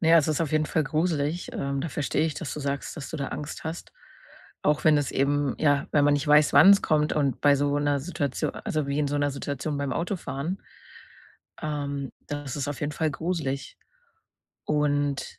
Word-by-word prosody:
na 160 - +2
ja, 165 - +8
es 155 0 +1
ist 155 - 0
auf 160 -3 -1
jeden 155 0 +2
Fall 155 0 0
gruselig, 155 +1 -1
ähm, 140 0 -2
da 165 - -3
verstehe 145 +2 0
ich, 160 -2 -1
dass 165 - -5
du 150 - -5
sagst, 140 0 -3
dass 155 - -7
du - - -4
da 140 -2 -3
Angst 150 +2 -6
hast, 160 +1 -6 0.7
auch 150 0 +1
wenn 155 -1 +6
es 145 -3 -1
eben 140 0 +1
ja, 145 -2 +2
wenn 145 -1 +4
man 145 0 +4
nicht 145 +1 -1
weiß, 150 0 +5
wann 195 - +8
es 200 0 +6
kommt 150 0 +2
und 140 -3 0
bei 145 -1 +5
so 145 +1 +1
'ner 145 -1 +1
Situatio 145 -4 -2
also, 155 -2 -3
wie 140 +1 -1
in 145 -1 +1
so 145 - -1
'ner 145 0 +1 0.5
beim 140 -2 -2
Autofahren 170 -2 -3 1.1
ähm, 140 -3 -3
das 145 -2 -5
ist 145 -1 -2
auf 145 - -4
jeden 145 0 -2
Fall 155 +1 0
gruselig. 145 -4 -3 0.9
Und, 145 -2 0
145 Hz, 205 wpm, -26 LUFS, 140-155 Hz, 1.1 s, ja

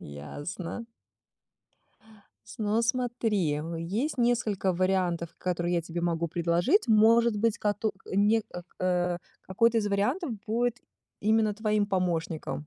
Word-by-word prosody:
Ясно. 145 - -7 1.7
Ну 215 +1 +1
смотри, 230 - 0
м, 160 +3 -4
есть 215 - -2
несколько 220 -5 +1
вариантов, 180 -2 0
которые 175 -1 -1
я 170 - +1
тебе 165 +1 -5
могу 170 -1 0
предложить. 175 - +1
Может 225 +1 +5
быть, 220 +1 +1
кото 210 +1 0 0.2
не, 205 +3 +3
э, 175 - -6 0.2
э, 180 -1 +1 0.2
какой-то 230 +4 +2
из 210 - -1
вариантов 250 - 0 0.2
будет 240 +2 0 0.5
именно 215 0 +3
твоим 215 -1 +1
помощником 170 -5 -2
200 Hz, 120 wpm, -28 LUFS, 175-225 Hz, 1.7 s, Может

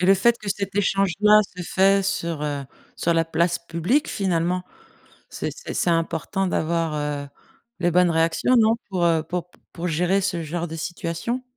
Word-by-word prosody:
Et 180 - +2
le 195 - +7
fait 235 +5 +3
que 210 - -7
cet 200 -1 -3
échange-là 200 +1 +4 0.2
se 180 - -4
fait 195 +3 +3
sur, 170 -5 -2
heu 145 -2 -2 0.3
sur 170 0 +1
la 165 0 +3
place 170 +1 0
publique, 170 - 0
finalement, 180 -2 0 0.7
c'est - - -4
c'est - - -7
c'est 175 - 0
important 165 +3 0
d'avoir, 165 -2 0
heu, 145 -1 -3 0.5
les 175 -1 +2
bonnes 180 +1 +4
réactions, 165 +9 +2
non? 225 0 +4
Pour, 180 -3 0
heu, 165 -2 +2
pour 175 +2 -4
p - - -24
pour 175 0 -4
gérer 180 +4 +1
ce 185 -4 -1
genre 170 +2 -3
de 160 - -6
situation? 175 +8 -3
175 Hz, 180 wpm, -23 LUFS, 165-195 Hz, 0.7 s, le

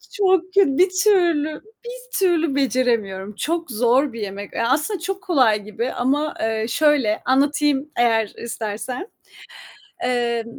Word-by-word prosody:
Çok 380 -3 +3
kötü, 380 -9 +3
bir 370 +1 +5
türlü, 335 -7 +2 0.2
bir - - -7
türlü 335 -6 +1
beceremiyorum. 230 -7 0
Çok 330 -1 -3
zor 245 +4 +2
bir 230 - -7
yemek, 200 0 -6
ya 230 +1 -1
aslında 310 +9 0
çok 385 +4 -5
kolay 255 - +2
gibi 215 +4 -4
ama, 285 +5 0
eee, 220 0 -1
şöyle, 285 -9 +2
anlatayım, 285 +2 +1
eğer 225 -3 +2
istersen. 235 - -5 1.0
Eee, 240 -2 0
265 Hz, 130 wpm, -21 LUFS, 230-330 Hz, 1.0 s, bir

